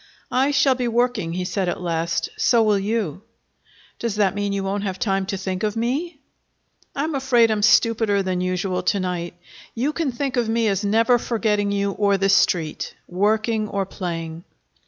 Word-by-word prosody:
"I 265 Hz, +2 st, +2 dB
shall 275 Hz, -1 st, +4 dB
be 250 Hz, -1 st, -2 dB
working," 235 Hz, -7 st, 0 dB
he 180 Hz, +1 st, -2 dB
said 185 Hz, -1 st, -1 dB
at -, -, -3 dB
last. 165 Hz, -1 st, -1 dB
"So 235 Hz, -2 st, +3 dB
will 210 Hz, -2 st, +3 dB
you." 200 Hz, -5 st, -2 dB, 0.8 s
"Does 230 Hz, -3 st, -2 dB
that 205 Hz, -3 st, +2 dB
mean 205 Hz, 0 st, -2 dB
you 200 Hz, 0 st, -2 dB
won't 195 Hz, +1 st, -2 dB
have 190 Hz, -2 st, -3 dB
time 195 Hz, -5 st, 0 dB
to 195 Hz, -, -2 dB
think 190 Hz, -1 st, -4 dB
of 210 Hz, -1 st, -1 dB
me?" 280 Hz, +9 st, -2 dB, 0.8 s
"I'm 300 Hz, +3 st, -1 dB
afraid 250 Hz, -4 st, +3 dB
I'm 215 Hz, -1 st, 0 dB
stupider 220 Hz, -2 st, +3 dB
than 185 Hz, -1 st, -1 dB
usual 185 Hz, 0 st, -1 dB
to 200 Hz, -, +1 dB
night. 175 Hz, -2 st, -3 dB, 0.4 s
You 270 Hz, +6 st, 0 dB
can 315 Hz, -5 st, -1 dB
think 265 Hz, +1 st, -3 dB
of 235 Hz, -2 st, +1 dB
me 225 Hz, 0 st, +1 dB
as 195 Hz, 0 st, -1 dB
never 230 Hz, +4 st, +3 dB
forgetting 210 Hz, -4 st, 0 dB
you 200 Hz, 0 st, 0 dB
or 200 Hz, 0 st, +1 dB
the 195 Hz, 0 st, +1 dB
Street, 175 Hz, -5 st, +1 dB
working 215 Hz, +4 st, 0 dB
or 200 Hz, -1 st, -1 dB
playing." 165 Hz, -3 st, -5 dB
205 Hz, 180 wpm, -22 LUFS, 190-235 Hz, 0.8 s, shall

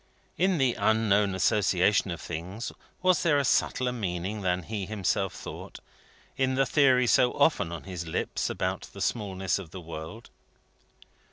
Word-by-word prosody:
In 185 Hz, 0 st, +2 dB
the 130 Hz, -4 st, +2 dB
unknown 105 Hz, -3 st, +2 dB
associations 95 Hz, 0 st, +2 dB
of 85 Hz, -, -5 dB
things, 90 Hz, +9 st, -5 dB, 0.3 s
was 185 Hz, -4 st, +4 dB
there 160 Hz, -4 st, +3 dB
a 140 Hz, -, +1 dB
subtler 125 Hz, 0 st, +1 dB
meaning 100 Hz, -2 st, -3 dB
than 90 Hz, -1 st, 0 dB
he 100 Hz, +1 st, -4 dB
himself 95 Hz, -2 st, -1 dB
thought, -, -, -9 dB, 0.6 s
in 130 Hz, -1 st, +1 dB
that 135 Hz, 0 st, +1 dB
theory 130 Hz, -4 st, +4 dB
so 125 Hz, +1 st, +4 dB
often 140 Hz, -, +2 dB
on 85 Hz, -, -6 dB
his 90 Hz, -3 st, -6 dB
lips 80 Hz, -, -2 dB
about -, -, -3 dB
the -, -, -10 dB
smallness 95 Hz, -4 st, -1 dB
of 95 Hz, -5 st, -9 dB
the 95 Hz, -, -8 dB
world? 80 Hz, +6 st, -9 dB
105 Hz, 155 wpm, -28 LUFS, 90-125 Hz, 0.6 s, was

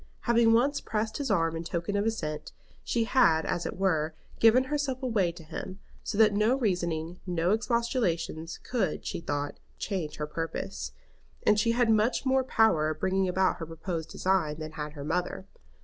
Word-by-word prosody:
Having 235 Hz, -1 st, +4 dB
once 275 Hz, +5 st, +3 dB
pressed 220 Hz, 0 st, -2 dB
his 285 Hz, -3 st, -2 dB
arm 165 Hz, -5 st, +2 dB
in 165 Hz, -, -4 dB
token 170 Hz, +4 st, -3 dB
of 205 Hz, +2 st, +1 dB
assent, 155 Hz, -9 st, -3 dB, 0.3 s
she 235 Hz, -, +1 dB
had 225 Hz, -10 st, +4 dB
as 175 Hz, -1 st, -1 dB
it -, -, -6 dB
were 160 Hz, -5 st, +1 dB, 0.2 s
given 230 Hz, +3 st, +6 dB
herself 275 Hz, -2 st, -2 dB
away 210 Hz, -9 st, +1 dB
to 170 Hz, -1 st, -12 dB
him, 180 Hz, +4 st, -7 dB, 0.3 s
so 205 Hz, -, -3 dB
that 215 Hz, -1 st, +6 dB
no 215 Hz, +5 st, +3 dB
reasoning, 175 Hz, -6 st, -1 dB
no 175 Hz, 0 st, +1 dB
expostulations 220 Hz, -8 st, 0 dB
could, 205 Hz, -11 st, -1 dB
she -, -, -3 dB
thought, 145 Hz, -2 st, -3 dB, 0.2 s
change 180 Hz, -7 st, -3 dB
her 150 Hz, -, -3 dB
purpose; 150 Hz, -, -4 dB, 0.5 s
and 210 Hz, 0 st, +5 dB
she 230 Hz, +2 st, +2 dB
had 240 Hz, -1 st, +3 dB
much 220 Hz, +5 st, +2 dB
more 265 Hz, 0 st, +3 dB
power 220 Hz, -11 st, +3 dB
of 155 Hz, 0 st, -4 dB
bringing 190 Hz, +1 st, +1 dB
about 185 Hz, +1 st, +2 dB
her 165 Hz, -, -5 dB
purposed 165 Hz, 0 st, -5 dB
design 180 Hz, -6 st, 0 dB
than 155 Hz, -1 st, -6 dB
had 150 Hz, -1 st, -5 dB
her 145 Hz, -2 st, -7 dB
mother. 180 Hz, +4 st, -2 dB
190 Hz, 180 wpm, -29 LUFS, 165-225 Hz, 0.5 s, given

